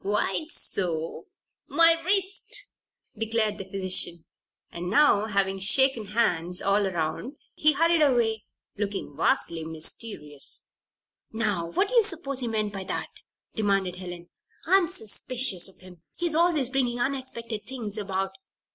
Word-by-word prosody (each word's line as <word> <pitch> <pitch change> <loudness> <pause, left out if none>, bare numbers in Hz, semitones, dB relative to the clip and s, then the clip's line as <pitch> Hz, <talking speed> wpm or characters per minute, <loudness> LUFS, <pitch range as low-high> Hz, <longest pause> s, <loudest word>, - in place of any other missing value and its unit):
"Quite 210 +9 0
so 170 - -1 0.4
my 330 +3 +6
wrist!" 390 +2 -1 0.5
declared 220 -1 0
the 195 - -5
physician, 185 -3 0 0.5
and 175 +1 -4
now, 220 -2 +5
having 195 -2 +1
shaken 240 +3 +3
hands 180 -5 0
all 200 0 +2
around, 180 - -3 0.2
he 305 0 +4
hurried 330 +2 +3
away, 235 -6 +3 0.3
looking 200 -7 -3
vastly 165 +1 +1
mysterious. 155 -2 -4 0.6
"Now, 210 -6 -1
what 390 - +1
do - - -6
you 470 -2 +6
suppose 310 -9 -2
he 245 - -2
meant 215 -2 -1
by 195 -1 -4
that?" - - -3 0.4
demanded 195 -4 0
Helen. 175 -1 -8 0.3
"I'm 375 0 +5
suspicious 230 - 0
of 190 - -18
him. 180 -3 -14
He's 345 -2 0
always 315 -6 +2
bringing 245 -3 0
unexpected 240 -4 -3
things 235 -6 -4
about. 195 -2 -2
215 Hz, 130 wpm, -27 LUFS, 190-270 Hz, 0.6 s, my